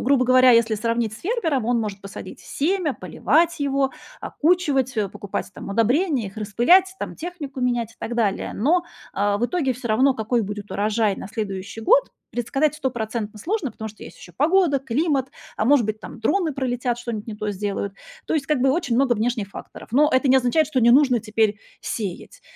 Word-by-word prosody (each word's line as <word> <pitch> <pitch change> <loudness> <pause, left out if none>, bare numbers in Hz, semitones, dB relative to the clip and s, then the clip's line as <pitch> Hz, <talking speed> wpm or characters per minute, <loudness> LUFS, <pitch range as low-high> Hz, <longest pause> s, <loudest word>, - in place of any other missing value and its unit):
грубо 260 0 +3
говоря, 255 0 +6
если 230 -1 +4
сравнить 230 0 -1
с - - -11
фермером, 335 - -1
он 240 0 +1
может 205 -3 -4
посадить 200 0 -9
семя, 335 0 -1
поливать 335 +3 +1
его, 275 -1 +1 0.3
окучивать, 290 -6 +1
э, 210 -2 0
покупать 200 +1 -5
там - - -9
удобрения, 245 - +1
их 195 - -11
распылять, 245 - +3
там - - -5
технику 310 -6 -6
менять, 240 -2 0
и - - -27
так 235 - -4
далее, 215 -5 0
но, 340 - +2 0.3
э, 205 0 +2
в 235 +4 0
итоге 285 -4 0
всё 245 0 -6
равно, 260 +5 +3
какой 225 +1 0
будет 205 0 -6
урожай 210 0 +1
на - - -7
следующий 200 -1 -5
год, - - +3 0.2
предсказать 270 +5 0
стопроцентно 230 -6 -3
сложно, 345 - -2
потому 220 - -6
что 215 - -13
есть - - -12
еще 175 - -13
погода, 325 - +3
климат, 270 +1 0 0.3
а - - 0
может 255 -2 +4
быть 215 0 -3
там - - -10
дроны 350 -6 +1
пролетят, 245 -2 -2
что-нибудь 235 -3 -5
не 220 - -5
то 210 0 -3
сделают, 200 0 -3 0.3
то - - -1
есть 295 - 0
как 300 -3 +1
бы 265 +1 +4
очень 270 -5 0
много 260 -1 +3
внешних 225 -2 -1
факторов. - - -11
Но 300 +4 +4
это 260 +1 +3
не 260 - +6
означает, 265 +5 +2
что 275 -3 -1
не 235 0 +5
нужно 255 -2 +5
теперь 215 -1 0 0.2
сеять, 215 - -5
245 Hz, 195 wpm, -23 LUFS, 215-285 Hz, 0.3 s, говоря